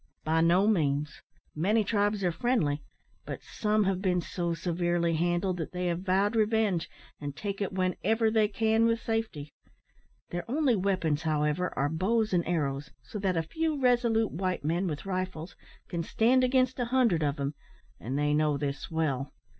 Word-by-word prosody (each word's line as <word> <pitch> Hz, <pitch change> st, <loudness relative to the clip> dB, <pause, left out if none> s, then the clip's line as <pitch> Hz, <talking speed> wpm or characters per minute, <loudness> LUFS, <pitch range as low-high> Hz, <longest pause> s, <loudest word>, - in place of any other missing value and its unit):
"By 160 Hz, +1 st, +2 dB
no 175 Hz, +4 st, +4 dB
means. 150 Hz, -7 st, 0 dB, 0.3 s
Many 205 Hz, +8 st, +2 dB
tribes 205 Hz, -1 st, 0 dB
are 175 Hz, -, +2 dB
friendly, 165 Hz, -, 0 dB, 0.4 s
but -, -, -6 dB
some 215 Hz, 0 st, 0 dB
have 190 Hz, -1 st, 0 dB
been 180 Hz, -2 st, +1 dB
so 170 Hz, 0 st, -2 dB
severely 175 Hz, 0 st, 0 dB
handled, 175 Hz, +3 st, 0 dB
that 165 Hz, 0 st, -5 dB
they 180 Hz, 0 st, -2 dB
have 170 Hz, -1 st, 0 dB
vowed 195 Hz, +3 st, +1 dB
revenge, 215 Hz, -5 st, +1 dB, 0.3 s
and 145 Hz, -1 st, -5 dB
take 200 Hz, +2 st, -4 dB
it 200 Hz, -, -1 dB
whenever 220 Hz, +4 st, +1 dB
they 220 Hz, -1 st, +3 dB
can 220 Hz, +2 st, +2 dB
with 230 Hz, 0 st, +1 dB
safety. 220 Hz, -12 st, -3 dB, 0.8 s
Their 175 Hz, 0 st, -3 dB
only 275 Hz, -2 st, +2 dB
weapons, 185 Hz, -6 st, 0 dB
however, 155 Hz, +2 st, 0 dB
are 140 Hz, -, +2 dB
bows 210 Hz, +7 st, 0 dB
and 175 Hz, -1 st, +3 dB
arrows, 140 Hz, -5 st, -1 dB
so 210 Hz, -, -7 dB
that 190 Hz, -3 st, 0 dB
a 165 Hz, -, +1 dB
few 315 Hz, -, -2 dB
resolute 240 Hz, -3 st, +2 dB
white 185 Hz, -2 st, -2 dB
men, 175 Hz, +4 st, 0 dB
with 150 Hz, 0 st, -4 dB
rifles, 185 Hz, -3 st, -4 dB, 0.3 s
can 170 Hz, -2 st, -3 dB
stand 240 Hz, +9 st, +3 dB
against 255 Hz, 0 st, +2 dB
a 245 Hz, -, +1 dB
hundred 235 Hz, -9 st, +2 dB
of 145 Hz, -2 st, +1 dB
them, 140 Hz, 0 st, -3 dB, 0.5 s
and 130 Hz, +6 st, -3 dB
they 145 Hz, 0 st, +1 dB
know 150 Hz, -1 st, +2 dB
this 140 Hz, -1 st, -4 dB
well. 145 Hz, -4 st, -1 dB
180 Hz, 170 wpm, -29 LUFS, 160-220 Hz, 0.8 s, no